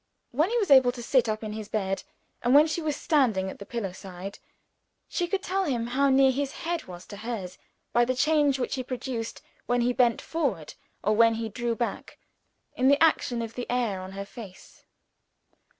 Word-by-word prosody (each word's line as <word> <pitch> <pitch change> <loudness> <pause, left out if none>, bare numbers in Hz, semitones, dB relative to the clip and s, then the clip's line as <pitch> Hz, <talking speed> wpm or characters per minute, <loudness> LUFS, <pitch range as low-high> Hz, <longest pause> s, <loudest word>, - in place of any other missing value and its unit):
When 305 +9 +2
he 480 - 0
was 405 -9 0
able 260 -2 +7
to 240 -1 -8
sit 245 -1 +3
up 215 +1 -2
in 215 -1 -4
his 215 -1 -6
bed, 195 -3 -1 0.4
and 245 +2 +3
when 295 +1 +8
she 315 +1 -2
was 305 -2 -1
standing 225 - +1
at - - -12
the 200 - -9
pillow 225 -6 -3
side, 185 +1 -9 0.7
she 350 - -1
could 390 +2 -2
tell 385 +1 0
him 245 -7 -1
how 270 +4 +2
near 265 0 +5
his 275 +1 -2
head 340 0 -2
was 180 -1 -10
to 205 - -10
hers, 210 -4 -5 0.3
by 240 0 +4
the 255 +1 0
change 290 0 +3
which 255 - -2
he 260 - -2
produced, 245 -2 -5 0.2
when 245 0 +2
he 245 +1 +2
bent 240 -2 +3
forward 245 - -2 0.3
or 215 +2 +2
when 230 0 +5
he 225 0 -3
drew 235 +2 -2
back, 235 +1 -4 0.6
in 255 - +2
the 280 +1 +6
action 250 -7 +2
of 230 0 -6
the 245 - -6
air 235 -6 0
on 185 +1 -8
her 200 0 -5
face. 200 -3 -12
240 Hz, 205 wpm, -27 LUFS, 215-275 Hz, 0.7 s, when